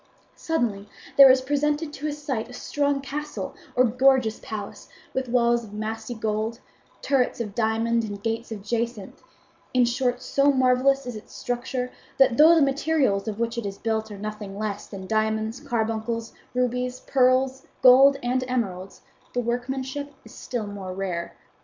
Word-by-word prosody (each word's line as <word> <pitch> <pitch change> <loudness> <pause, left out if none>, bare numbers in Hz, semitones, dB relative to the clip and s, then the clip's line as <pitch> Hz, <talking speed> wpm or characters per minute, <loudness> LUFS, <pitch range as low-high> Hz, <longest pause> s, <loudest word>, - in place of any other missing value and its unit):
"Suddenly 220 -11 -2 0.3
there 275 -1 +10
is 260 0 +5
presented 295 +2 0
to 300 +1 -4
his 295 0 -3
sight 260 -6 -3
a - - -11
strong 285 +2 -1
castle 295 +2 -5 0.2
or 255 - +5
gorgeous 250 -1 +3
palace 210 -2 -7 0.2
with 260 -1 -2
walls 235 -1 +3
of 210 -2 -12
massy 220 +2 -4
gold, 220 +1 -2 0.4
turrets 265 -4 +1
of 210 -4 -4
diamond 230 +1 +1
and 205 -2 -6
gates 230 +1 -2
of 210 -3 -6
jacinth; 230 -1 -3 0.5
in 250 -1 +5
short, 245 0 0
so 280 +1 +3
marvellous 260 +1 +3
is 245 -2 -5
its 215 - -11
structure 250 +1 -3 0.3
that 260 -3 +4
though 320 +3 +8
the 320 - +5
materials 275 -7 +1
of 210 -2 -3
which 235 0 -1
it 230 - -5
is 195 0 -6
built 220 -1 -2
are 205 - -8
nothing 210 -1 -6
less 210 -1 -4
than 190 -2 -8
diamonds, 220 +2 0
carbuncles, 230 -3 -2 0.2
rubies, 250 0 -1
pearls, 260 0 +2 0.2
gold, 270 +2 +8
and 255 +1 0
emeralds, 195 -7 -3 0.3
the 245 - 0
workmanship 260 +4 -3
is - - -13
still 240 -4 -4
more 195 -2 -6
rare. 180 -3 -4
240 Hz, 160 wpm, -25 LUFS, 220-265 Hz, 0.5 s, there